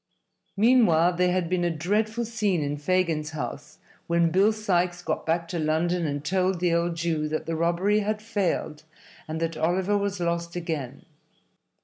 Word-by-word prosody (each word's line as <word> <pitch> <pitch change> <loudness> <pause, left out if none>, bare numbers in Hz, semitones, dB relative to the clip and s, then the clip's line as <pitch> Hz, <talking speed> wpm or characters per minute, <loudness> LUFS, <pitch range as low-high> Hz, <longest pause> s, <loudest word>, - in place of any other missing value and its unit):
Meantime 195 -7 +4
there 180 0 +3
had 180 -2 0
been 180 0 0
a 175 - +2
dreadful 210 +8 -1
scene 210 -7 0
in 145 0 -2
Fagin's 160 -1 0
house 145 -1 -6 0.3
when 170 -1 +2
Bill 195 +5 +4
Sikes 180 -5 0
got - - -3
back 165 +1 0
to 170 - -3
London 160 +2 0
and 145 0 -4
told 185 0 +1
the 175 -1 +1
old 170 0 0
Jew 160 -2 -1
that 155 +1 -3
the 165 - -2
robbery 175 +6 +2
had 215 +1 -1
failed 200 -8 -2 0.5
and 160 +1 -4
that 165 0 -2
Oliver 185 +5 +1
was 200 -1 -1
lost 170 0 -2
again. 160 -7 -4
175 Hz, 165 wpm, -26 LUFS, 160-190 Hz, 0.5 s, Meantime